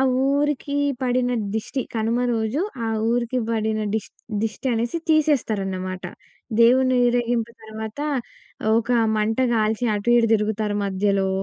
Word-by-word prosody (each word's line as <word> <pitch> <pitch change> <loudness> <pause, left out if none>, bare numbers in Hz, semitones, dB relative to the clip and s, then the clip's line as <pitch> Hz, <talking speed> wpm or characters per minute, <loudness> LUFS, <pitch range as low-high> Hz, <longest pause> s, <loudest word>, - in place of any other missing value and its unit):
ఆ - - +4 0.3
ఊరికీ 285 0 0 0.3
పడిన 250 0 +1 0.2
దిష్టి 240 +4 -2
కనుమ 225 +1 0 0.2
రోజు, 220 +6 -1 0.3
ఆ - - -1 0.2
ఊరికి 240 +1 0
బడిన 220 -1 0
డిష్ 220 -2 -2 0.3
దిష్టినేసి 235 +4 -1
తీసేస్తారన్నమాట. 200 - 0 0.6
దేవుని 255 +2 +5
ఊరేగింపు 240 -1 0
తర్వాత, 220 +3 -7 0.8
ఒక 235 +1 -3 0.3
మంట 215 +2 0 0.2
గాల్చి, 220 +1 +1
అటు 205 +2 -3
ఇటు 230 -1 +4
దిరుగుతారు 210 -1 0
మధ్యలో, 195 0 +1
225 Hz, 115 wpm, -23 LUFS, 215-250 Hz, 0.8 s, దేవుని